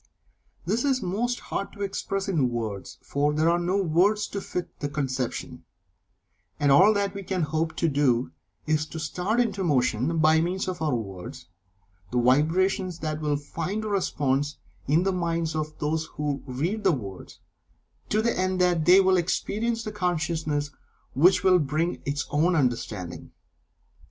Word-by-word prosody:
This 215 +7 0
is 265 -5 +1
most 230 +7 -1
hard 200 - -4
to 205 - -5
express 195 0 -3
in 155 -10 +1
words, 110 -5 -5
for 145 +1 0
there 155 +2 +2
are 170 - +2
no 180 +3 0
words 195 +4 +2
to 200 - -4
fit 180 -2 -5
the 145 - -2
conception, 130 -2 -3 1.0
and 145 -2 +3
all 185 +10 +7
that 200 -1 0
we 200 - -5
can 185 -2 -2
hope 160 +1 -1
to 170 - +1
do 130 - +1 0.3
is 155 -1 +1
to 160 - -7
start 180 +8 -1
into 205 -5 0
motion, 135 0 +1
by 160 0 +4
means 180 +3 -1
of 180 -3 -4
our 150 -5 +1
words, 115 +4 -7 0.6
the 125 - +1
vibrations 165 +8 +2
that 155 -1 -3
will 150 -1 0
find 170 +8 -4
a - - -2
response 145 -7 0 0.3
in 155 +6 +3
the 195 0 +1
minds 170 -2 -1
of 155 0 -3
those 155 +1 -1
who 145 -2 -2
read 165 +12 -2
the - - +5
words, 100 - -6 0.7
to 215 +1 +1
the 235 - +1
end 185 0 0
that 175 -3 +2
they 180 +2 +8
will 190 -1 +4
experience 225 +6 -1
the 215 - -4
consciousness 160 -6 -1 0.4
which 180 +6 +4
will 185 -1 +5
bring 155 +3 -1
its 140 0 -1
own 165 +5 +2
understanding. 115 - -2
160 Hz, 165 wpm, -26 LUFS, 145-190 Hz, 1.0 s, they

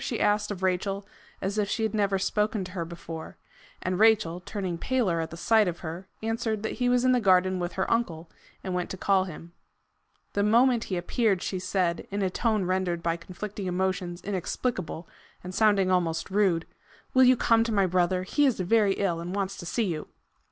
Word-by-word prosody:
she 240 - -2
asked 210 0 +2
of 190 -3 -5
Rachel, 195 +2 0 0.4
as 200 +3 -1
if 205 -1 0
she 225 - -1
had 220 -1 0
never 200 -2 +1
spoken 210 +1 0
to 180 - -8
her 180 -3 -3
before; 165 -1 -8 0.5
and 185 +1 -1
Rachel, 215 -6 +4
turning 180 -2 -4
paler 225 -10 +1
at 160 - -2
the 165 - -9
sight 220 +3 +3
of 170 -1 -4
her, 170 +3 -6 0.2
answered 225 -1 -1
that 220 - -1
he 245 - +3
was 250 0 +3
in 255 - +5
the 250 -1 +3
garden 185 -2 +3
with 175 0 -3
her 190 - 0
uncle, 170 -8 -1 0.4
and 185 - -3
went 180 -1 -2
to 190 - -5
call 190 0 +2
him. 170 -1 -10 0.8
The 200 - +1
moment 235 +3 +4
he 185 - -2
appeared 195 +2 +1
she 190 - -2
said, 180 -2 -1
in 200 0 -2
a 185 - 0
tone 215 -2 0
rendered 180 -2 -1
by 165 0 +1
conflicting 190 +3 -6
emotions 180 -1 -2
inexplicable, 185 -3 -3 0.4
and 180 +1 -7
sounding 200 -3 +3
almost 175 0 0
rude, 190 -5 +2 0.5
"Will 260 - +6
you 255 0 +6
come 225 0 +4
to 230 - -2
my 200 -3 +3
brother? 180 0 +1
He 290 +10 +2
is 255 - 0
very 200 +2 +3
ill, 185 -4 -1
and 175 +3 -5
wants 195 -1 -2
to 175 - -7
see 230 +5 0
you." 160 -5 -3
190 Hz, 205 wpm, -27 LUFS, 180-215 Hz, 0.8 s, Will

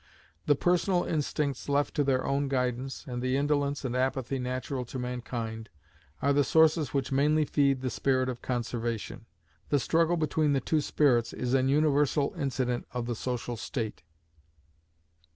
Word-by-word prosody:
The 145 - +5
personal 175 +4 +2
instincts 145 -3 -2
left 145 +1 +1
to 145 - +1
their 130 -2 +1
own 140 +1 0
guidance, 130 0 -2
and 120 -1 -4
the 130 +1 +1
indolence 145 -1 0
and 125 -1 -2
apathy 130 0 -1
natural 130 +1 -3
to 125 - -7
mankind, 120 -3 -4 0.5
are 140 +1 +3
the 145 0 +4
sources 160 0 +3
which 135 -2 -1
mainly 150 +3 +3
feed 140 -3 +2
the 130 -1 -2
spirit 130 -1 +1
of 125 -2 -4
Conservation. 120 -2 -3 0.4
The 145 - +3
struggle 165 +6 +2
between 155 -1 +1
the 135 - +2
two 155 +4 0
spirits 125 -6 +2
is 125 0 -2
an 135 0 +3
universal 145 +1 +2
incident 130 -5 -2
of 125 -1 -3
the 120 - -2
social 120 0 -3
state. 110 -1 -4
135 Hz, 155 wpm, -29 LUFS, 125-145 Hz, 0.5 s, The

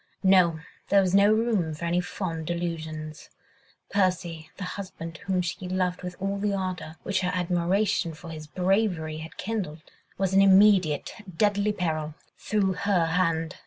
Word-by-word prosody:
No! 180 -4 +5 0.3
there 200 - +6
was 185 -1 0
no 200 +1 +6
room 215 -8 +1
for 170 - -5
any 175 +1 +1
fond 165 -4 -4
delusions! 160 -3 -4 0.6
Percy, 175 -4 0
the 200 - -5
husband 180 -3 -6
whom 185 -2 +1
she 180 +1 -4
loved 180 -1 -1
with 180 0 -6
all 195 +1 -2
the 205 0 0
ardour 185 -4 -4
which 195 -1 0
her 180 - 0
admiration 180 0 +1
for 165 +1 -10
his 155 -1 -8
bravery 180 -3 0
had 160 +1 -9
kindled, 185 -8 -4 0.3
was 190 -1 0
in 195 - +6
immediate, 195 -5 +5 0.2
deadly 205 0 +2
peril, 155 -5 -2 0.2
through 200 -3 0
her 185 -2 +1
hand. 165 -1 0
180 Hz, 155 wpm, -26 LUFS, 165-195 Hz, 0.6 s, there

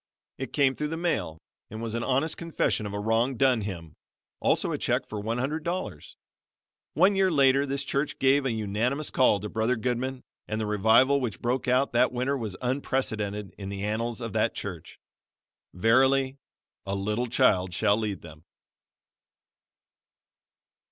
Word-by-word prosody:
It 135 -2 -5
came 140 -3 +3
through 150 - -2
the 160 +2 -4
mail 105 - -1 0.3
and 110 - -7
was 115 -1 -4
an 115 0 -2
honest 135 +4 +1
confession 165 -10 -1
of 100 - -7
a - - -2
wrong 115 +4 +1
done 130 -3 +3
him, 85 -6 -6 0.5
also - - +1
a - - -1
check - - 0
for 105 - -5
one 110 +3 -2
hundred 150 +6 -2
dollars. 180 +3 -5 0.8
One 200 +1 +4
year 190 -1 +3
later 140 -3 +4
this 140 0 -2
church 140 +2 -1
gave 135 +1 +3
a 135 - 0
unanimous 115 +7 -1
call 125 -5 +4
to 105 - -4
Brother 110 +4 0
Goodman 125 +2 -2 0.2
and 110 0 -2
the 110 - -1
revival 110 +7 +4
which 115 -7 -3
broke 125 +2 -1
out 130 +2 +2
that 125 +2 +3
winter 125 +3 -1
was 110 -8 -4
unprecedented 110 -6 -2
in 100 -1 -5
the 100 0 -5
annals 115 +3 -2
of 115 -3 -5
that - - +1
church. - - -7 0.7
Verily, 130 +7 +3 0.5
"A 100 - -1
little 105 +5 -1
child 95 -5 +2
shall 100 +3 +2
lead 105 -4 -3
them." 75 -2 -12
120 Hz, 165 wpm, -27 LUFS, 105-135 Hz, 0.8 s, One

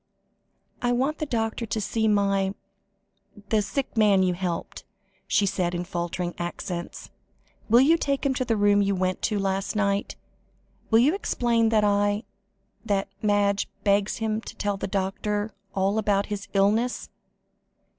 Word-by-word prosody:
"I 245 0 +1
want 270 +5 0
the 305 - -2
doctor 225 -2 -2
to 220 - -2
see 220 +2 0
my 195 -2 +1 0.9
the 215 -1 +3
sick 265 +7 -3
man 205 -4 +4
you 180 -1 +2
helped," 175 -1 -4 0.4
she 205 - +2
said 180 -2 -1
in 175 - -2
faltering 175 0 -3
accents. 175 0 -5 0.6
"Will 235 +3 +7
you 325 +5 +4
take 280 -1 -1
him 275 - +2
to 255 - -1
the 230 -3 0
room 205 0 +4
you 200 0 +1
went 185 0 -1
to 210 - 0
last 195 +1 -1
night? 200 -1 0 0.7
Will 225 - +5
you 265 +7 +4
explain 235 - +1
that 220 -1 +3
I 205 +1 +2 0.6
that 200 -3 -1
Madge 205 -1 +1
begs 200 0 +2
him 220 -1 -1
to - - -10
tell 205 -1 -1
the 195 - -4
doctor 205 +2 -2 0.2
all 195 +2 +1
about 200 -2 +1
his 200 0 -6
illness? 215 +5 +1
205 Hz, 155 wpm, -25 LUFS, 195-225 Hz, 0.9 s, Will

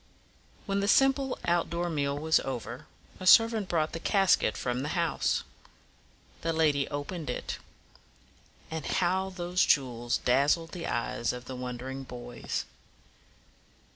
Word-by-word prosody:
When 200 -1 0
the 200 - 0
simple 270 +2 +3
out 175 0 +1
door 170 +1 -2
meal 145 -4 -1
was 160 +2 +3
over, 125 +2 -5 0.3
a 185 - -4
servant 225 -4 +6
brought 160 -2 +1
the 165 - -5
casket 195 - +3
from 125 0 -2
the 140 - -3
house. 170 -2 +1 1.0
The 165 - 0
lady 150 -4 +2
opened 145 +1 -5
it. 125 - -4 1.1
Ah, 160 0 -3
how 190 +4 +1
those 180 -1 0
jewels 120 -3 +1
dazzled 145 +6 +2
the 175 -2 -5
eyes 120 0 -1
of 125 0 -8
the 130 - -6
wondering 125 +2 -5
boys! 120 -2 -5
160 Hz, 135 wpm, -29 LUFS, 130-180 Hz, 1.1 s, servant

